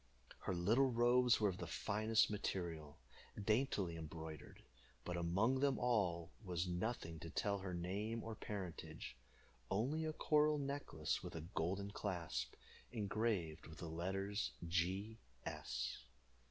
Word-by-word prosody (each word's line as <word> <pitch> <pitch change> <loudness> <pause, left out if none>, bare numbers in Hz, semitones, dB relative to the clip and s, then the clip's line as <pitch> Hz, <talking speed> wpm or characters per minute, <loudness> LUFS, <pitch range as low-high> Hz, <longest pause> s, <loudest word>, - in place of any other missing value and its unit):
Her - - -1
little 115 +10 +4
robes 120 +1 +5
were 105 -2 +4
of 90 - -4
the 90 - -3
finest 110 +6 +3
material, 85 -7 -2 0.4
daintily 105 -5 +2
embroidered, 80 -1 -7 0.4
but 90 - -1
among 95 +10 +3
them 140 0 +3
all 95 -8 +2
there 110 - -15
was 90 0 +1
nothing 90 -3 -2
to 80 - -6
tell 100 +4 +1
her 95 -2 -3
name 105 +6 -1
or 115 - -4
parentage, 85 - -5 0.5
only 135 +11 +1
a 155 - 0
coral 150 0 +4
necklace 140 - -1
with - - -6
a 80 - -3
golden 95 +4 -1
clasp, 85 - -2 0.4
engraved 105 -7 0
with 80 0 -10
the 85 - -5
letters 95 - -1
"G. 95 +6 0 0.3
S." - - -2
95 Hz, 135 wpm, -41 LUFS, 85-115 Hz, 0.5 s, robes